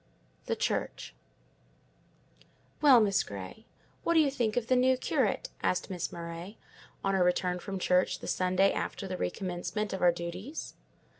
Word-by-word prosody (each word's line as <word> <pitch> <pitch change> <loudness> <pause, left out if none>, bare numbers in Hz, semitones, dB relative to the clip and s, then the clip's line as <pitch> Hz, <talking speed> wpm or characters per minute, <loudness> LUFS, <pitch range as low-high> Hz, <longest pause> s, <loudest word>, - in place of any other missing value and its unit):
THE - - 0
CHURCH - - -2 1.7
"Well, 275 -5 +8
Miss 200 -2 +3
Grey, 100 - -8 0.4
what 335 - +2
do - - +7
you 295 -3 +4
think 235 -5 -1
of 240 - +1
the 255 - +3
new 255 +1 +4
curate?" - - 0
asked 180 - 0
Miss 180 -3 -3
Murray, 170 +4 -7 0.5
on 195 - +1
our 190 -2 +3
return 180 0 +1
from 195 +2 -5
church 180 0 +2
the - - -10
Sunday 185 +2 +2
after 195 - -3
the 185 - -3
recommencement 185 - -3
of 190 - -4
our 175 - +6
duties. 175 - -6
190 Hz, 155 wpm, -30 LUFS, 180-230 Hz, 1.7 s, Well